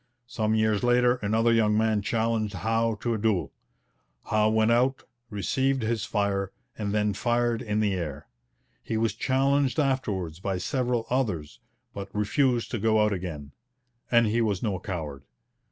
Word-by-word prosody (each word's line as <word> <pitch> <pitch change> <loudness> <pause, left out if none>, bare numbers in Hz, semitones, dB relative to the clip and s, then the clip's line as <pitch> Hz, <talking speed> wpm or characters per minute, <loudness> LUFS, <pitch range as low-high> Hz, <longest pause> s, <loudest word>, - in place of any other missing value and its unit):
Some 110 -3 -1
years 110 -2 +2
later 125 0 +3
another 115 +1 +2
young 105 -2 +3
man 110 -1 +2
challenged 110 -1 -1
Howe 115 +2 0
to 120 - 0
a 110 - -2
duel. 95 -10 0 0.8
Howe 110 0 +3
went 110 +1 +3
out, 125 +3 +2 0.3
received 130 +5 0
his 110 -1 -1
fire, 100 -3 -1 0.2
and 105 -2 -3
then 105 0 +1
fired 120 +2 0
in 105 -3 -1
the 105 -2 +1
air. 75 -5 -4 0.6
He 110 - -3
was 115 0 +1
challenged 135 0 +1
afterwards 100 - -1
by 95 0 -2
several 120 +4 -1
others, 95 - -1 0.3
but 100 -1 -6
refused 120 +3 +1
to 120 - -2
go 110 +1 +3
out 105 - +1
again. 80 -6 -6 0.6
And 120 -1 +5
he 110 +2 +1
was 105 -5 0
no 100 -5 -1
coward. 75 -7 -5
110 Hz, 155 wpm, -27 LUFS, 100-120 Hz, 0.8 s, And